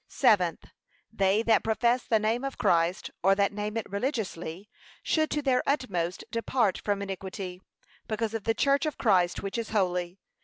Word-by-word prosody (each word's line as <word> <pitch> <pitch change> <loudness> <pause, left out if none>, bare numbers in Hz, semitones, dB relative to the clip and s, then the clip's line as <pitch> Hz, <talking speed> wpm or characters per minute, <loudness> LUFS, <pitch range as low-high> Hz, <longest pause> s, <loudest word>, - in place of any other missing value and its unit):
Seventh, 185 - +2 0.5
They 200 0 +2
that 225 -1 +3
profess 235 +3 +2
the 225 - +2
name 220 +4 0
of 275 0 -4
Christ, 170 +1 +1
or 195 +2 +4
that 200 0 +1
name 210 +2 -3
it 225 - -3
religiously, 200 - -3 0.4
should 315 -1 +1
to 295 - -1
their 260 -2 +3
utmost 185 - -1
depart 230 -3 0
from 200 -1 -1
iniquity, 190 -1 -6 0.5
because 220 0 -2
of 225 -2 -4
the 225 - +1
church 280 +5 +2
of 305 - -4
Christ 185 -6 +2
which 195 +4 -3
is 225 - -4
holy. 180 -3 0
210 Hz, 165 wpm, -28 LUFS, 190-230 Hz, 0.5 s, or